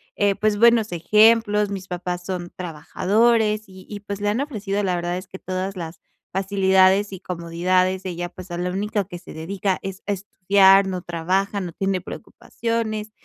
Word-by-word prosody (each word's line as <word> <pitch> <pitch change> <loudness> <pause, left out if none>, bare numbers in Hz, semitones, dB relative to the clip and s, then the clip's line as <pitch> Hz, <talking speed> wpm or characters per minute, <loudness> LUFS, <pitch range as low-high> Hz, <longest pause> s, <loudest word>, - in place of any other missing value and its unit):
eh, 205 -1 +2
pues, 215 0 +1
buenos 230 -1 +4
ejemplos, 210 +3 +4
mis 195 -2 -6
papás 180 0 -4
son 180 -2 -4
trabajadores, 210 +6 +1
y 190 -1 -14
y 205 - -6
pues, 205 0 -6
le 205 - +1
han 220 +6 0
ofrecido 210 -8 -2
la 185 -2 +1
verdad 175 0 -2
es 185 - -8
que 190 - -9
todas 185 +1 -4
las 165 -1 -7 0.3
facilidades, 190 +1 +3
y 190 - -7
comodidades. 185 +2 0
Ella, 175 -1 -4
pues, 185 0 -11
a 175 - -3
la 180 +1 -2
único 205 +1 -1
que 175 -3 -8
se - - -12
dedica 190 +4 -2
es 195 0 -6
a 205 - +1
estudiar, 195 0 +4
no 185 -1 -3
trabaja, 190 +4 -1
no 175 -3 -6
tiene 195 +1 -1
preocupaciones, 220 +2 -4
190 Hz, 175 wpm, -22 LUFS, 180-205 Hz, 0.3 s, buenos